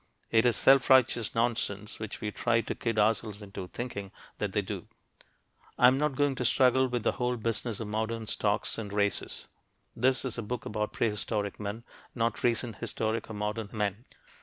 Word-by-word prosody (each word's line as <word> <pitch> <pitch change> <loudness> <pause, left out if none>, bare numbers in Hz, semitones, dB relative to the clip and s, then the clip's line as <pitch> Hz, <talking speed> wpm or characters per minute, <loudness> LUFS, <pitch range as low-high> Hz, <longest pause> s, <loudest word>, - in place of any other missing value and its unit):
It 115 +2 +5
is 120 - +3
self 135 -1 +5
righteous 125 -4 +4
nonsense 110 -3 -1
when 110 -1 -4
we 105 - -3
try 115 +2 +1
to - - -4
kid 115 -2 -2
ourselves 105 -1 +1
into 95 -2 -7
thinking 100 -3 -6 0.3
that - - -1
they - - 0
do. - - -6 0.9
I - - +5
am 130 +2 +6
not 150 -2 +1
going 145 0 +2
to - - -1
struggle 130 +2 +4
with 120 -3 -2
the - - +3
whole 125 -1 -1
business 115 -1 -1
of 110 - -4
modern 110 +1 -2
stocks 105 +1 +1
and 105 -3 -5
races. 100 -1 -1 0.5
This 130 +3 +2
is 125 -2 -1
a - - -1
book 120 +2 -4
about 105 0 -2
prehistoric 105 -2 -1
men, 105 +2 -5 0.3
not 115 -1 -1
recent 115 -1 +1
historic 110 0 -2
or 110 - -6
modern 105 +1 -3
men. 105 0 -2
115 Hz, 185 wpm, -29 LUFS, 105-120 Hz, 0.9 s, am